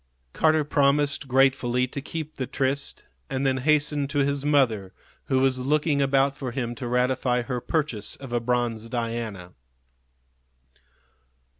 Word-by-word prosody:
Carter 155 -1 +3
promised 145 0 +1
gratefully 130 -1 +3
to 135 +2 -6
keep 155 +1 -6
the 130 - -3
tryst, 140 +1 -2 0.3
and 135 +1 -1
then 130 -1 +2
hastened 145 0 +1
to 145 - -3
his 140 0 +1
mother, 120 -10 +2 0.3
who 130 - +1
was 130 -1 +2
looking 145 +2 +1
about 135 0 +2
for 135 -3 -5
him 120 -1 -3
to 125 0 -6
ratify 125 0 +1
her 125 -1 -3
purchase 125 -7 -2
of 135 -3 -9
a 120 - +2
bronze 115 -2 -1
Diana. 115 -6 -4
130 Hz, 140 wpm, -25 LUFS, 120-140 Hz, 0.3 s, Carter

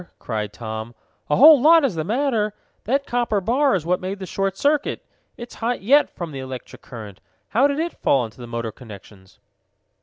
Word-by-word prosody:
cried 105 -3 -4
Tom. 110 +1 -7 0.3
"A 150 - +3
whole 300 -1 +8
lot 320 +1 +6
is 250 - 0
the 160 -2 -3
matter! 220 - 0 0.3
That 275 +5 0
copper 240 -5 0
bar 255 +7 +2
is 170 -4 -3
what 180 +1 0
made 190 +2 -4
the 190 - -7
short 195 +1 -2
circuit. 290 0 0 0.3
It's 240 0 -9
hot 235 -2 -1
yet 280 +8 +4
from 170 -3 -7
the 135 - -7
electric 130 -1 -8
current. 105 -6 -10 0.3
How 255 +6 +3
did 280 0 -2
it 335 +2 -4
fall 135 - +3
on 115 -2 -5
the 120 +1 -11
motor 115 -1 -4
connections?" 100 -4 -14
195 Hz, 190 wpm, -22 LUFS, -, 0.3 s, whole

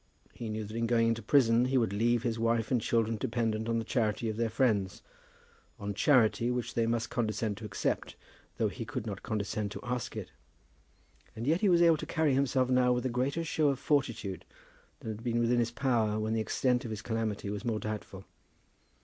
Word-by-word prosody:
He 115 - -6
knew 110 0 -3
that 110 +2 -8
in 115 0 0
going 115 -1 +3
into 115 0 -1
prison 115 0 +4
he 130 +1 +1
would 115 -5 +1
leave 115 +3 +2
his 115 -2 -1
wife 115 +1 +1
and 125 -3 +2
children 115 0 +1
dependent 110 0 -1
on 115 - +1
the 115 - -2
charity 110 -2 0
of 110 - -3
their 115 0 0
friends, 105 -7 0 0.8
on 100 0 -3
charity 115 0 +3
which 125 -1 -2
they 115 -1 +1
must 115 0 -1
condescend 110 -3 -1
to 110 - -8
accept, 100 -2 -2 0.4
though - - +2
he - - -5
could - - -5
not - - -5
condescend 105 0 -2
to - - -6
ask 125 -1 -3
it. - - -6 1.0
And 115 - -5
yet 160 +6 +2
he 205 - +4
was 175 -1 +5
able 165 -2 +5
to 155 - -6
carry 160 -4 +1
himself 130 -1 +2
now 125 -1 +3
with 125 0 0
a - - +1
greater 130 +7 -1
show 155 -2 +1
of 135 - 0
fortitude 120 - -1 0.6
than 110 - -4
had 110 +1 -8
been 120 -1 0
within 120 +1 +2
his 115 -1 +1
power 115 -4 0
when 110 +1 -1
the 110 - +1
extent 125 +3 +1
of 115 - -5
his 110 -1 -5
calamity 110 -3 -2
was 105 +1 -5
more 115 -3 -1
doubtful. 105 -3 -6
115 Hz, 210 wpm, -31 LUFS, 110-125 Hz, 1.0 s, was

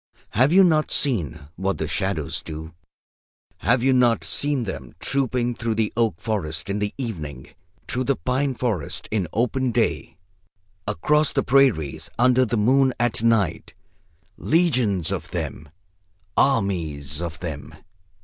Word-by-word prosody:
"Have 130 +7 +3
you 190 +2 +7
not 155 -4 +3
seen 85 - 0 0.2
what 95 +2 -1
the 80 - -2
shadows 80 -1 -2
do? 80 +1 -8 0.8
Have 120 +2 +2
you 135 0 +4
not 120 -2 +3
seen 145 -3 -1
them 95 - -7
trooping 125 -3 0
through 115 -1 -2
the 110 -1 0
oak 115 -8 +1
forest 90 -4 -3
in 100 - -1
the 105 0 -1
evening, 80 - -6 0.4
through 130 0 -1
the 140 - +2
pine 130 +2 -1
forest 110 - -2
in 100 -5 0
open 125 +3 0
day, - - -1 0.7
across 150 - +2
the - - +1
prairies 120 - +2
under 125 +1 +4
the 120 0 -1
moon 130 +4 +3
at 120 -2 +1
night, 110 -8 +1 0.6
legions 125 - +2
of 90 -2 -4
them, 80 -3 -5 0.7
armies 85 - +1
of 85 -1 -5
them? 80 -5 -6
110 Hz, 140 wpm, -23 LUFS, 85-130 Hz, 0.8 s, you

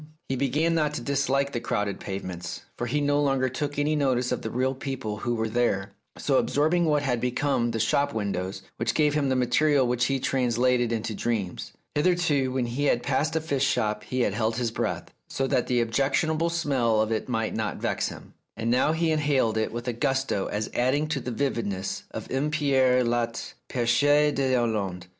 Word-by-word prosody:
He 135 - 0
began 145 +6 +1
not 150 -2 +1
to - - -3
dislike 140 +1 0
the 120 - -2
crowded 105 -4 -2
pavements, 90 -3 -5
for 120 - -3
he 150 +5 0
no 145 0 +2
longer 135 -2 +1
took 145 +3 -4
any 150 +1 +1
notice 130 -4 +1
of - - -1
the 110 - -4
real 130 +3 0
people 130 -5 -4
who 120 +2 -1
were 110 0 -1
there, 110 -4 0 0.3
so - - +2
absorbing 160 +4 +2
had 125 -4 -1
become 125 -1 0
the 115 -1 -2
shop 140 +6 +2
windows 95 -3 -3
which 115 0 -1
gave 150 -2 +3
him 145 -2 +1
the 130 - +2
material 130 +3 +3
which 125 0 +1
he 135 +1 0
translated 125 -2 +1
into 110 -1 -2
dreams. 105 -5 -3 0.2
Hitherto, 150 -5 +2
when 130 -1 0
he 125 +5 -2
had 120 -3 +2
passed 145 +4 0
a - - +3
fish 145 -4 -1
shop 105 -6 0
he 130 0 -1
had 100 - +1
held 110 +1 0
his 120 -1 -1
breath, - - -3 0.2
so 135 - -1
that 125 -2 +1
the 125 -1 +2
objectionable 140 +7 +1
smell 135 -10 +1
of 110 +1 +1
it 110 +3 -2
might 115 -3 -1
not 110 -2 -2
vex - - -1
him; - - -11 0.2
now, 125 +6 +2
he 165 0 +1
inhaled 145 -7 +2
it 110 0 0
with 120 +1 -6
a 125 - 0
gusto 135 -4 0
as 105 +1 -3
adding 130 +5 +1
to 150 -3 -1
the 125 - -5
vividness 115 -7 -2
of - - -6
M. 135 +3 0
Pierre 135 -4 +3
Loti's 120 0 -2 0.2
"Pecheur 145 +5 +3
dTslande." 115 -9 0
125 Hz, 195 wpm, -26 LUFS, 115-145 Hz, 0.3 s, gave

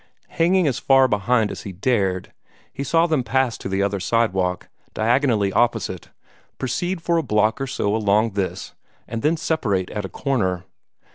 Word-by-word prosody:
Hanging 175 +2 +2
as 135 -5 0
far 135 -1 +5
behind 110 0 +1
as - - -7
he 100 - -7
dared, 95 -2 -1 0.4
he 140 - -4
saw 165 +4 +3
them 155 -5 +1
pass 130 0 +1
to - - -5
the 95 +1 0
other 100 0 -1
sidewalk 95 -3 0 0.3
diagonally 115 -3 +2
opposite, 115 -7 0 0.5
proceed 170 +7 -2
for 170 -1 +1
a - - +2
block 110 0 +1
or 135 - -2
so 105 -5 -1
along 110 +1 +2
this, 95 -2 -4 0.3
and 115 0 -4
then 160 +5 +2
separate 105 - -1
at 105 - -4
a 95 - -5
corner. 95 -11 -1
115 Hz, 165 wpm, -22 LUFS, 100-135 Hz, 0.5 s, far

